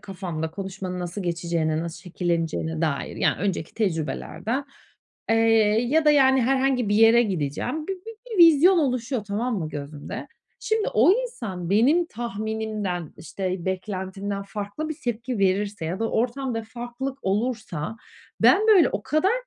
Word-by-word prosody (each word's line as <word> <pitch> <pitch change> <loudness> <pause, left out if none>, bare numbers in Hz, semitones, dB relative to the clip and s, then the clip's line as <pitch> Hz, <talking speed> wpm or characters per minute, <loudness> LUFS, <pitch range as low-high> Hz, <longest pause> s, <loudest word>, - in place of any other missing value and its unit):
kafanda 180 -5 -5
konuşmanın 190 0 -5
nasıl 180 +3 -4
geçeceğine, 170 -2 -1
nasıl 170 0 -6
şekilleneceğine 165 -2 -2
dair, 155 -4 -2
ya - - +2
önceki 185 -4 -2
tecrübelerden. 205 - -2 0.7
Eee, 225 - +4 0.5
ya 310 +4 +3
da, 300 - +6
yani, 265 -2 +5
herhangi 260 -2 +1
bir 205 - +2
yere 225 +2 +6
gideceğim, 190 - -2
bi - - 0
bi 385 +4 -9 0.2
bir 435 - -3
vizyon 335 +4 +6
oluşuyor 255 -4 -1
tamam 215 +3 -2
mı 160 -3 -3
gözümde. 145 0 -7 0.4
Şimdi, 440 -1 0
o 250 - +6
insan 230 - -3
benim 275 - +4
tahminimden, 215 - -4
işte, 185 +2 -4
beklentimden 190 +1 -3
farklı 205 +9 -5
bir 315 - -4
tepki 240 0 -2
verirse 200 -1 0
ya 175 +5 -3
da 225 - 0
ortamda 240 0 -1
farklılık 240 +4 -6
olursa, 210 -4 -2 0.4
ben, 430 - +5
böyle, 385 -6 +7
o - - -3
kadar 310 +7 +2
210 Hz, 140 wpm, -24 LUFS, 180-255 Hz, 0.7 s, böyle